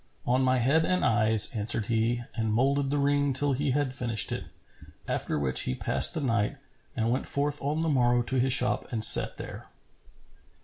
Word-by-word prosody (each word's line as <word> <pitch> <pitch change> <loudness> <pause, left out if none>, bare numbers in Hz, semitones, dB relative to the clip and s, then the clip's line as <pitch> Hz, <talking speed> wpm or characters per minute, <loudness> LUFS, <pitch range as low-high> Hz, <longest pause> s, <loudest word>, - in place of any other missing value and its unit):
"On 125 +2 0
my 130 0 0
head 140 +7 0
and 185 +2 -1
eyes," 110 -1 +2
answered 110 -1 -1
he 115 +1 -2
and 110 -2 -4
moulded 135 +4 -1
the 145 - -2
ring 145 0 -1
till 145 +1 0
he 140 +2 -3
had 135 0 -2
finished 115 -5 -2
it, - - -6 0.6
after - - -4
which 65 -3 0
he 65 - -3
passed - - +2
the 160 - -4
night 115 0 -2 0.4
and 115 -2 -2
went 130 - -3
forth 145 +1 -3
on 150 +3 -3
the - - -2
morrow 120 -4 0
to 130 +2 -3
his 130 +1 0
shop 125 0 +2
and 110 -3 0
sat - - +8
there. - - -10
125 Hz, 190 wpm, -26 LUFS, 115-140 Hz, 0.6 s, sat